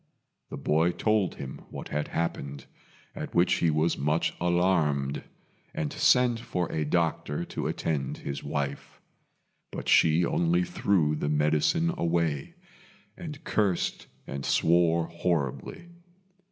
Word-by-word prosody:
The - - -6
boy 80 +3 +2
told 110 -4 +1
him 65 -1 -7
what - - -8
had 75 0 -2
happened, 70 -4 -3 0.5
at - - -6
which 85 +1 +4
he 85 - +3
was 80 +2 +1
much 75 +3 +1
alarmed, 85 -6 +1 0.5
and 75 -2 -2
sent 125 -2 +4
for 90 -7 -2
a 80 - -1
doctor 80 -1 0
to - - -4
attend 75 -5 -2
his 70 - -5
wife; 70 -1 -4 0.7
but - - -6
she 80 +2 +5
only 175 - +2
threw 100 - +1
the 75 - -2
medicine 75 - +2
away, 85 - 0 0.6
and 150 -5 -8
cursed 100 -5 0 0.2
and 70 0 -5
swore 85 +1 +3
horribly. 85 - -3
85 Hz, 125 wpm, -28 LUFS, 75-90 Hz, 0.7 s, she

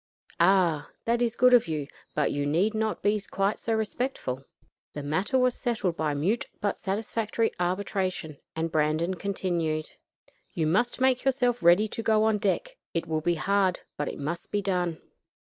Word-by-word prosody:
"Ah! 170 -4 +3 0.2
that 235 +1 +1
is 235 -2 +1
good 250 +1 +5
of 240 -7 +6
you; 155 -3 -2 0.3
but 150 - +2
you 145 - -1
need 170 +10 +2
not 220 0 -1
be 205 0 +2
quite 195 +2 0
so 225 - -1
respectful." 220 - -2 0.5
The 145 - -5
matter 160 - 0
was 255 -1 +3
settled 220 -10 -1
by 155 -3 -1
mute 190 +11 0
but 205 - -1
satisfactory 220 +2 -1
arbitration, 185 -4 -2 0.2
and 165 0 -2
Brandon 155 +3 +1
continued: 170 -5 -2 0.6
"You 160 - +1
must 210 +12 +1
make 260 -1 +3
yourself 250 -3 +1
ready 175 +5 +5
to 225 - -4
go 220 -1 +3
on 220 -1 +2
deck. - - -1 0.2
It 165 - 0
will 155 -1 -1
be 175 +2 +1
hard, 195 +2 +1
but 145 - -2
it - - -4
must 150 +5 -4
be 205 -1 0
done." 180 -4 0
190 Hz, 170 wpm, -27 LUFS, 160-220 Hz, 0.6 s, of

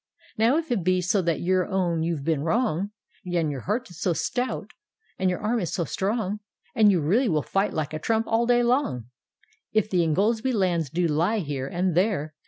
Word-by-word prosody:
" - - -28
Now 235 +7 +4
if 325 -4 -3
it 200 -7 0
be 185 +1 +2
so 180 +3 +1
that 170 -4 -1
you 185 +1 +2
own 180 -4 0
you've 165 -3 -2
been 155 -2 0
wrong, 200 - 0 0.3
And 175 -4 -1
your 140 - -4
heart 225 - -2
is 175 - -12
so 180 - +2
stout 250 +9 -2 0.5
and 185 0 +2
your 180 - -1
arm 225 +3 0
is 175 - -3
so 175 - 0
strong. 205 +2 -2 0.3
And 215 -2 +5
you 185 - +2
really 215 - +2
will 155 -4 +1
fight 195 +2 0
like 155 -1 -3
a 155 - -3
trump 225 +6 0
all 230 +1 +1
day 245 0 +4
long; 190 - 0 0.3
— - - -37
If 215 -1 +1
the 180 -2 +3
Ingoldsby 220 - +1
lands 175 - +1
do 175 +5 0
lie 170 +8 +1
here 145 -8 -3
and 180 +3 0
there. 175 -4 0
185 Hz, 215 wpm, -25 LUFS, 165-220 Hz, 0.5 s, And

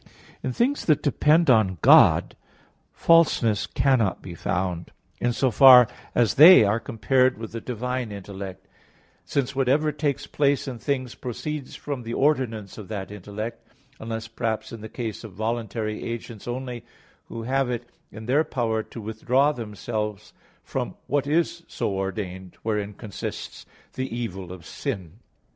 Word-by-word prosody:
In 130 - -2
things 255 - 0
that 155 -3 +3
depend 155 +3 +3
on 105 -6 +3
God, - - +6 0.6
falseness 150 -10 +3
cannot 125 -8 +1
be 90 - -9
found, 90 0 -2 0.3
in 120 - +1
so 130 +1 +1
far 125 +1 +9 0.3
as 120 -3 +3
they 160 -2 +9
are 105 +2 +2
compared 130 +4 +1
with 110 -1 -7
the 115 0 -6
divine 125 0 -3
intellect; 100 -1 -8 0.6
since 135 -1 -1
whatever 140 +3 +2
takes 145 -1 -2
place 140 -1 +1
in 125 -3 -5
things 130 +1 -2
proceeds 135 +3 -5
from 140 -3 -5
the 115 0 -5
ordinance 120 -9 0
of 105 - -9
that 100 -3 -5
intellect, 105 +3 -6 0.4
unless 115 0 -5
perhaps 115 -1 -3
in 115 -2 -8
the 110 - -8
case 115 -2 -5
of 110 -4 -9
voluntary 110 0 -3
agents 115 -2 -6
only, 125 -1 -5 0.4
who 115 - -7
have 135 +2 0
it 120 0 -4 0.2
in 110 0 -9
their 140 +6 +3
power 115 -6 -1
to 115 - -10
withdraw 125 +7 +1
themselves 105 -3 -5 0.3
from - - -4
what 140 -1 0
is 170 +2 +1
so - - -2
ordained; 95 -1 -4
wherein 105 -2 -2
consists 105 -2 -7 0.3
the 130 0 -3
evil 95 -6 -5
of 90 -3 -10
sin. 95 0 -5
115 Hz, 150 wpm, -25 LUFS, 105-130 Hz, 0.6 s, far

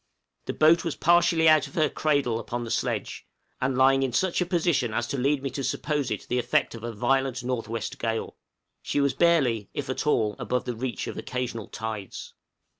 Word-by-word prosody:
The - - -3
boat 160 +3 +4
was 165 -4 -2
partially 170 -1 +4
out 155 -3 +5
of - - -15
her 155 -2 +3
cradle 140 -6 0
upon 120 +1 -4
the 115 - -6
sledge, - - -2 0.3
and 130 0 0
lying 135 +1 +5
in 130 -2 -1
such 185 +6 +1
a 180 - 0
position 160 -10 +1
as 120 - 0
to 140 - -2
lead 140 +2 +1
me 135 - -2
to 140 - -4
suppose 145 -1 -1
it 105 - -4
the 125 - 0
effect 120 0 +1
of 115 -1 -9
a 120 - -3
violent 130 +3 0
north 125 -2 -2
west 115 0 -4
gale. 115 -1 -2 0.5
She - - -1
was 140 -2 +2
barely, 135 - +2
if 135 -2 -3
at 130 - -3
all, 110 -8 +2
above 125 0 -1
the 125 - -3
reach 125 +1 -3
of - - -6
occasional 125 -4 -4
tides. 110 -3 -6
130 Hz, 205 wpm, -26 LUFS, 115-150 Hz, 0.5 s, out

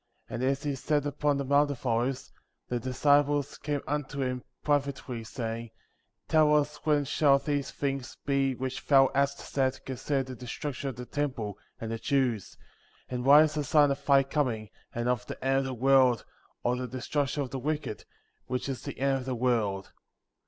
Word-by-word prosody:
And 120 - -5
as 135 +2 +1
he 145 -1 -1
sat 145 +2 0
upon 145 0 0
the 140 - -2
Mount 145 +2 +4
of 135 -2 -6
Olives, 125 +2 -1 0.3
the 120 - -1
disciples 145 +3 +2
came 145 -2 -2
unto 145 -1 -2
him 125 -1 -2 0.2
privately, 140 -5 -1
saying: 115 -1 -5 0.6
Tell 155 -1 +5
us 150 0 +1
when 150 -2 +1
shall 140 0 +4
these 145 -1 -2
things 135 -3 -3
be 135 -2 +1
which 130 +1 -4
thou 135 -2 +6
hast 140 0 +2
said 130 -1 -1
concerning 135 +1 -1
the 130 -1 -7
destruction 130 +3 -4
of 130 - -6
the 125 +2 -7
temple, 120 -9 -3 0.2
and 115 0 -4
the 115 - -3
Jews; 125 -7 0 0.5
and 125 -1 -3
what 145 +3 +8
is 155 -1 0
the 150 -1 -1
sign 145 0 +4
of 140 +1 -3
thy 140 -1 +5
coming, 125 -8 -1 0.2
and 120 +1 -2
of 125 0 0
the - - -6
end 135 0 +3
of 135 - -1
the 130 - -3
world, 130 -1 +4 0.4
or 120 +1 +2
the 125 0 -3
destruction 140 +3 -1
of 130 - -7
the 135 - -3
wicked, 145 - -3 0.4
which 125 +1 -2
is 135 -3 -4
the - - -7
end 135 0 +2
of 125 - -7
the 130 -1 -2
world 110 -6 0
135 Hz, 190 wpm, -29 LUFS, 125-145 Hz, 0.6 s, what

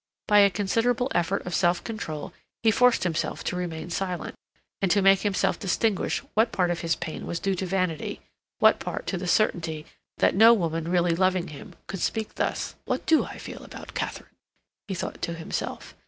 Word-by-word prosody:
By 210 0 +6
a 200 0 +7
considerable 225 +6 0
effort 175 +3 0
of 180 - -4
self 175 +1 +2
control 160 -10 -5 0.3
he 225 - +5
forced 250 +2 +4
himself 170 -3 -2
to - - -2
remain 170 -2 -4
silent, 180 -2 -3 0.5
and 195 - +2
to 200 - +4
make 195 0 +6
himself 200 -2 0
distinguish 200 +1 0
what 225 +2 +3
part 180 -4 +1
of 170 - -2
his 165 -1 0
pain 160 - -6
was 170 - -3
due 195 - 0
to 190 0 -3
vanity, 185 -4 -1 0.4
what - - +5
part - - -5
to 190 - -2
the 180 - -4
certainty 165 -5 +1 0.3
that - - +3
no 225 +4 +8
woman 165 -4 -2
really 175 -1 +3
loving 185 -1 +1
him 145 - -11
could 195 - -5
speak 220 -1 -1
thus. - - -2
"What - - -2
do 320 - +4
I - - -9
feel - - -8
about - - -10
Katharine?" - - -4 0.6
he 195 - -3
thought - - -5
to 170 - -2
himself. 165 0 -5
185 Hz, 190 wpm, -26 LUFS, 170-205 Hz, 0.6 s, no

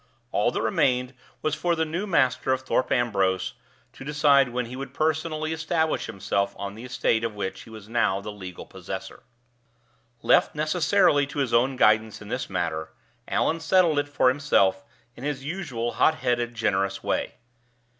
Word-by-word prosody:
All - - +2
that - - -2
remained 125 0 +1 0.3
was 155 - 0
for 175 +1 0
the 160 0 0
new 170 +6 -3
master 130 -7 +2
of 130 0 +1
Thorpe 130 0 0
Ambrose 100 -6 +1 0.4
to - - -11
decide 145 -2 +4
when 125 0 -2
he 120 +2 -8
would 135 +1 -7
personally 155 0 -1
establish 160 0 -1
himself 100 0 -1
on 100 0 -5
the 115 +4 -9
estate 115 -2 0
of 115 -2 -2
which 100 -2 -4
he - - -14
was 110 -2 -11
now 110 -4 +1
the 105 +1 -7
legal 95 -3 -9
possessor. - - -8 1.0
Left - - +4
necessarily 155 -1 +3
to 145 - -9
his 135 -4 0
own 125 +3 +3
guidance 110 -2 +3
in 105 - -11
this 125 +2 -3
matter, 80 -4 -2 0.4
Allan 165 - +1
settled 165 -2 +3
it 145 0 -2
for 145 -3 +3
himself 100 -9 +2 0.3
in 125 - -11
his 145 -2 -3
usual 145 -9 -3
hot 160 - +3
headed, 120 -3 -1
generous 100 -3 0
way. - - -1
130 Hz, 170 wpm, -25 LUFS, 110-155 Hz, 1.0 s, decide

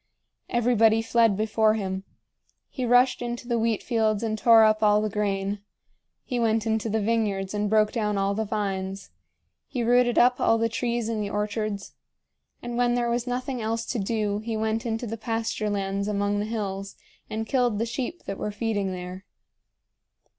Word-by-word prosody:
Everybody 225 -2 +3
fled 225 -3 +3
before 220 0 +2
him. 190 -2 -3 0.7
He 255 -4 -3
rushed 245 +2 +4
into 240 0 -4
the 235 -2 +1
wheat 225 -2 0
fields 220 -3 +1
and 220 -1 -1
tore 225 +1 +6
up 215 0 +3
all 210 -1 +5
the 215 -1 -1
grain; 200 -1 -1 0.6
he 250 -2 -3
went 225 -1 +1
into 220 0 0
the 220 +1 0
vineyards 205 -3 0
and 210 0 -1
broke 215 0 +3
down 210 -3 -1
all 195 0 +1
the 220 +2 -1
vines; 195 - -3 0.6
he 245 - -3
rooted 245 +1 +3
up 250 +1 +5
all 225 - +4
the 230 0 +1
trees 235 0 -1
in 225 -2 -2
the 205 - -3
orchards; 210 0 -3 0.7
and, 240 0 -4
when 245 0 +2
there 240 -1 0
was 240 +1 -1
nothing 255 0 -3
else 225 +1 -2
to 245 - -2
do, 210 0 -1
he 220 0 -3
went 220 +1 -1
into 225 +1 -2
the 225 0 -4
pasture 225 -1 -2
lands 200 0 -2
among 205 0 0
the 205 - -1
hills 200 -3 -4 0.3
and 220 +1 -3
killed 245 -3 +1
the 225 - 0
sheep 255 +8 -4
that 195 - -6
were - - -2
feeding 205 -2 -2
there. 180 +1 -7
220 Hz, 180 wpm, -26 LUFS, 205-235 Hz, 0.7 s, tore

